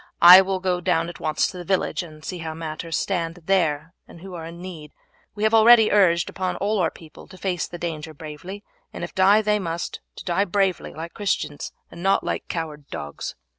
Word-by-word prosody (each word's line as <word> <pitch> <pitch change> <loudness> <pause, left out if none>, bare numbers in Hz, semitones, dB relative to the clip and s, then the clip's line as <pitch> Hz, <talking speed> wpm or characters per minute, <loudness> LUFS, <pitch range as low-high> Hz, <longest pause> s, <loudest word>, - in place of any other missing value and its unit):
I 180 +2 +12
will 190 0 -2
go 180 -1 -1
down 170 -2 +1
at 175 - -10
once 155 - +1
to 185 - -4
the 175 - -6
village 190 +2 0
and 155 -3 -12
see 180 - -5
how 160 -1 -5
matters 160 0 -4
stand 170 -2 -2
there 165 -4 +1
and - - -14
who 190 0 -9
are 165 -2 -6
in 170 +1 -10
need. 165 -5 -9 0.4
We 210 - -4
have 220 +1 +3
already 225 0 +7
urged 175 -5 +4
upon 185 -1 -3
all 205 +1 0
our 170 -3 +2
people 155 -1 -14
to 185 - -14
face 180 -3 -2
the 175 - -8
danger 160 -2 -5
bravely, 160 +7 -8 0.3
and - - -7
if 175 - -6
die 200 +3 +5
they 210 0 +2
must, 170 -2 -4 0.2
to - - -9
die 185 +3 +1
bravely 195 -1 0
like 165 +2 -7
Christians, 195 -8 -2 0.2
and 170 - -10
not 195 +2 +2
like - - -3
coward 150 -4 -5
dogs. 75 0 -6
175 Hz, 210 wpm, -23 LUFS, 165-195 Hz, 0.4 s, I